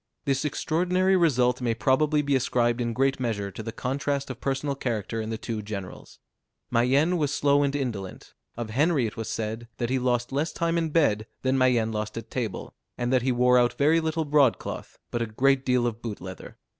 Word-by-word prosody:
This 135 0 0
extraordinary 180 +5 +1
result 125 -8 +2
may 115 -2 0
probably 150 +4 +2
be 140 -1 +1
ascribed 120 -1 +1
in 120 -1 -1
great 135 +3 +1
measure 105 -5 -2
to 110 - -7
the 115 +1 -5
contrast 140 +3 -2
of 125 - -10
personal 140 +1 -1
character 115 -4 -3
in 110 - -5
the 110 - -3
two 110 -1 -4
generals. 100 -3 -8 0.5
Mayenne 135 +9 +3
was 150 -3 0
slow 145 -1 +3
and 140 0 0
indolent. 115 -9 -5 0.2
Of 115 -2 -4
Henry 145 +2 +2
it 110 - -4
was 115 - -5
said, 110 +1 -4
that 120 0 -2
he 130 - +2
lost 120 0 0
less 145 +4 -1
time 170 0 0
in 165 -1 -1
bed 115 -9 +2 0.2
than 130 0 +2
Mayenne 125 -4 +3
lost 105 0 -4
at 115 - -7
table; 115 -6 -4 0.2
and 120 +1 -1
that 130 - +4
he 130 +2 +1
wore 125 0 +4
out 120 0 +2
very 155 +4 +4
little 160 0 -1
broad 145 -4 +4
cloth, - - -7
but 120 - -1
a 115 - -1
great 135 +5 +2
deal 125 -2 +2
of 115 -1 -3
boot 110 -4 -5
leather. 95 0 -9
125 Hz, 205 wpm, -26 LUFS, 115-145 Hz, 0.5 s, that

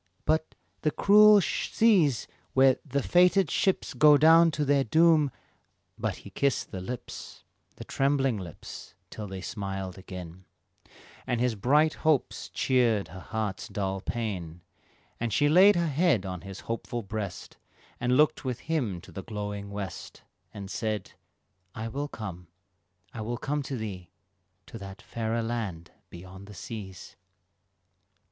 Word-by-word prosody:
"But 160 0 0 0.3
the 155 - +2
cruel 210 +4 +7
seas 180 - +2 0.3
where 130 -1 +5
the 140 -2 -2
fated 180 -1 +4
ships 190 - 0
Go 150 +3 +7
down 165 +2 +7
to 150 -2 -1
their 140 -1 +3
doom" 160 +2 +4 0.7
But - - -2
he - - -10
kissed 140 -2 0
the 95 - -5
lips 120 +6 -8 0.3
The - - -9
trembling 135 -3 +1
lips, 85 -5 -10 0.2
till 105 -1 -6
they 95 -1 -7
smiled 95 -2 -5
again, 90 -1 -9 0.8
And 120 -2 0
his 125 -1 +1
bright 150 +9 +3
hopes 155 -4 +1
cheered 120 -6 +1
her 95 - -9
heart's 105 0 -4
dull 95 -1 -3
pain, 90 -8 -4 0.6
And 120 -1 -2
she 145 +8 +3
laid 185 +7 +7
her 170 0 +1
head 145 - +2
on 90 -2 -5
his 95 -1 -9
hopeful 115 +1 -4
breast, 100 -1 -6 0.4
And 125 +1 +2
looked 150 +1 +3
with 125 -3 -3
him 125 - -2
to - - -14
the 95 - -6
glowing 105 -1 -5
west, 100 -2 -7 0.3
And 100 -1 -8
said, 110 -2 -3 0.6
"I 115 0 -4
will 140 +5 -3
come, 90 - -8 0.7
I 110 - -6
will 120 +2 -3
come 145 +4 -2
to 135 -1 -5
thee 95 -6 -6 0.6
To 115 - -10
that 95 -1 -9
fairer 115 0 -2
land 110 -8 -4 0.2
beyond 95 +3 -11
the 105 - -11
seas." 95 -3 -8
115 Hz, 145 wpm, -28 LUFS, 100-145 Hz, 0.8 s, cruel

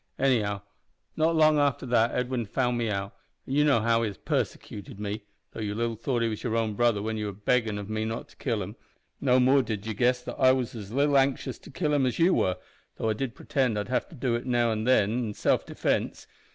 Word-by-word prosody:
Anyhow, 105 -7 +1 0.5
not 160 +1 +2
long 155 -1 +5
after 140 -2 +1
that 120 -2 +3
Edwin 125 -2 -2
found 125 +3 0
me 120 -2 -1
out 100 -1 -3 0.3
an' 130 - -5
you 145 +1 +4
know 140 -6 +4
how 115 +1 +2
he 115 - +1
has 100 -3 -6
persecuted 100 -1 -4
me, 105 0 -4 0.3
though - - -9
you 105 -1 -3
little 115 0 -1
thought 120 +1 -1
he - - +2
was 110 -2 -4
your 115 -2 -1
own 110 -2 0
brother 115 -2 +2
when 110 0 -2
you 105 -1 -2
were 100 - -4
beggin' 110 +1 0
of 100 -1 -6
me 110 0 -2
not 110 +1 -4
to - - -19
kill - - -1
him - - -8 0.4
no 130 -2 +3
more 130 +2 +5
did 110 -4 -4
you 110 - -2
guess 125 +4 +2
that - - -7
I 130 -1 +6
was 125 -2 -2
as 105 -4 -8
little 140 +2 +3
anxious 135 -1 -1
to - - -14
kill 150 -4 -1
him 135 -3 +3
as 125 - -2
you 175 +3 +4
were, 90 -1 +1 0.4
though 110 - -1
I - - +1
did 125 +3 -4
pretend 130 -6 0
I'd 105 - -3
have 130 - -1
to - - -12
do 125 -2 -1
it 120 +2 -2
now 120 -2 +2
an' 110 0 -2
then 110 -5 +4
in 115 -2 -2
self - - +1
defence. - - -1
120 Hz, 245 wpm, -27 LUFS, 110-130 Hz, 0.5 s, I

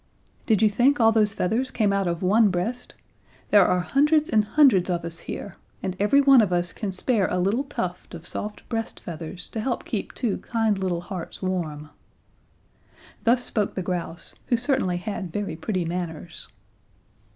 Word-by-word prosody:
"Did 220 -2 +3
you 215 - +6
think 260 +7 +3
all 225 -1 +6
those 210 -2 +2
feathers 230 +8 0
came 210 -4 +1
out 195 -2 +1
of 170 +1 -2
one 210 +3 +4
breast? 225 +8 -3 0.6
There 205 -3 +7
are 180 - +2
hundreds 300 - +2
and 215 -2 +4
hundreds 210 -6 +4
of 175 -2 -1
us 165 0 -6
here, 200 - -7 0.3
and 185 -1 -2
every 245 +8 +4
one 275 -3 +7
of 205 -4 0
us 175 0 0
can 205 -3 -4
spare 200 +1 +1
a - - -1
little 200 +9 +1
tuft 180 -11 -5
of 165 0 -10
soft 210 +3 -6
breast 225 -1 -4
feathers 170 +2 -7
to 225 - -5
help 240 +2 -2
to - - -17
keep 210 - -3
two 230 -5 -1
kind 225 -4 0
little 180 -3 -1
hearts 180 +1 -7
warm!" 155 -5 -3 1.3
Thus 245 +2 +3
spoke 210 -4 -2
the 185 - -2
grouse, 175 -2 -4
who 240 - +2
certainly 230 -8 0
had 190 -2 -5
very 200 -3 -3
pretty 180 +2 -2
manners. 170 -1 -5
200 Hz, 180 wpm, -25 LUFS, 180-230 Hz, 1.3 s, There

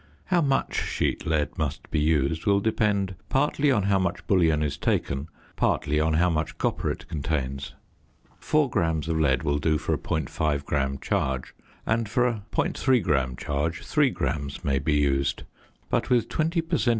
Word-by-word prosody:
How 175 - +5
much 135 -3 +1
sheet - - -1
lead 80 +1 0
must 75 -2 -3
be 80 - +1
used 75 +2 +1
will 100 -1 +4
depend 100 -3 +1 0.2
partly 145 +1 +2
on 105 -6 +2
how 100 0 +2
much 95 -2 -2
bullion 80 -5 +3
is 75 -2 -1
taken, 70 +2 -1 0.3
partly 75 +2 +1
on 80 0 +2
how 85 +3 +3
much 80 -1 -2
copper - - -1
it - - -5
contains. 70 -2 -3 0.6
Four 150 -2 +2
grams 80 - 0
of 80 -1 0
lead 65 -4 +2
will 75 -1 +1
do 80 +1 +2
for - - -1
a - - -1
.5 75 -1 -1
gram 70 -2 0
charge; 65 0 -2 0.3
and 110 -1 0
for 125 +4 +2
a 115 -5 -1
.3 130 -5 +1
gram 65 -6 +1
charge, 75 +5 -2
3 145 -3 +3
grams 70 - -3
may 70 -1 +2
be 75 +2 0
used. 70 -2 +1 0.5
But - - 0
with 120 -3 +2
20 165 +2 0
per 165 0 -1
cent. 120 - +2
80 Hz, 175 wpm, -26 LUFS, 70-105 Hz, 0.6 s, How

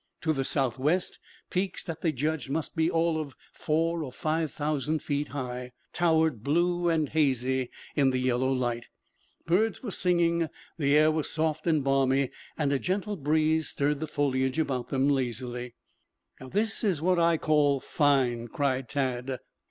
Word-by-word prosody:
To 160 -1 +1
the 135 -2 -1
southwest, 135 +6 0 0.3
peaks 185 0 -1
that 165 -2 -6
they 165 - +2
judged 150 +1 -2
must 155 +2 -3
be 160 0 +2
all 165 -1 +1
of 140 -5 -8 0.2
four 165 +2 0
or 135 - -6
five 155 +2 -1
thousand 150 +1 -1
feet 145 0 -1
high, 125 -2 -5 0.2
towered 160 -8 +2
blue 175 +4 +2
and 160 -3 +2
hazy 130 -4 +1 0.3
in 140 -3 +4
the 130 - 0
yellow 130 +1 +1
light. 120 -2 -1 0.6
Birds 205 +8 +1
were 220 - -4
singing, 170 -3 +2 0.3
the 145 -2 +3
air 155 +1 +5
was 155 -1 -1
soft 155 0 -1
and 155 -4 +3
balmy 135 -1 +2 0.3
and 145 -2 +1
a 140 - +1
gentle 200 +5 -1
breeze 155 0 +1
stirred 145 0 0
the 155 - -3
foliage 130 -2 0
about 130 -6 -1
them 135 0 +1
lazily. 125 -2 -2 0.6
"This 205 - -2
is 190 -8 +1
what 180 +2 +2
I 170 -1 +4
call 150 -3 +3
fine," 130 -6 +1
cried 130 0 -1
Tad. 130 -2 -1
150 Hz, 160 wpm, -28 LUFS, 130-160 Hz, 0.6 s, air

